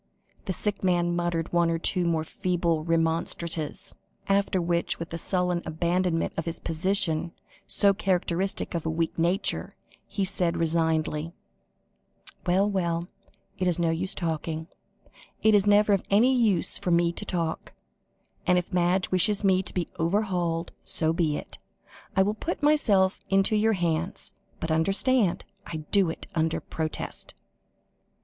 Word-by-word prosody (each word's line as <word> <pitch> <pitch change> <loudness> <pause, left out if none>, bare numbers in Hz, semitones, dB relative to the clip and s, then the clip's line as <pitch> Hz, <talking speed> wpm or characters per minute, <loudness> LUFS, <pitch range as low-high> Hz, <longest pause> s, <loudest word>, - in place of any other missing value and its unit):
The - - -2
sick 205 +2 -3
man 175 -2 +2
muttered 175 -1 -2
one 170 -1 +3
or 165 - +1
two 180 +2 0
more 160 -2 +1
feeble 170 -1 -1
remonstrances, 165 +2 -1 0.3
after 195 -1 +2
which, 170 0 0
with 165 - -6
the 165 - -5
sudden 180 -1 0
abandonment 170 +1 0
of 165 - -2
his 165 0 -4
position, 170 -1 +1 0.3
so 200 -1 +3
characteristic 190 -1 -1
of 170 -2 -2
a 160 - -2
weak 165 +1 -2
nature, 175 +5 0 0.3
he 195 - -1
said 175 -2 +2
resignedly: 160 -1 0 1.1
"Well, 190 +3 +3
well, 175 -3 -1 0.5
it 185 - +1
is 175 - +3
no 170 -2 +1
use 175 +3 -1
talking 160 -1 -3 0.8
it 220 - +5
is 205 -1 +4
never 205 0 +5
of 195 - +2
any 230 +6 +4
use 220 -9 +2
for 200 - -3
me 170 0 +3
to 210 - -6
talk 170 -5 -3 0.8
and 180 0 +4
if 180 +1 -3
Madge 180 +1 +1
wishes 200 +3 +2
me 190 -1 +4
to - - -6
be 175 -3 -2
overhauled, 175 -2 0
so 160 0 +1
be 160 -4 0
it. - - -9 0.6
I 190 - +5
will 205 +2 0
put 300 +8 -4
myself 205 -11 +3
into 195 +2 +3
your 220 +1 +3
hands, 170 0 -1 0.3
but, 165 - -3
understand, 195 +6 +2 0.2
I 165 - -6 0.2
do 195 -4 +4
it 160 - -6
under 160 -1 0
protest." 160 -1 -5
175 Hz, 150 wpm, -26 LUFS, 165-195 Hz, 1.1 s, it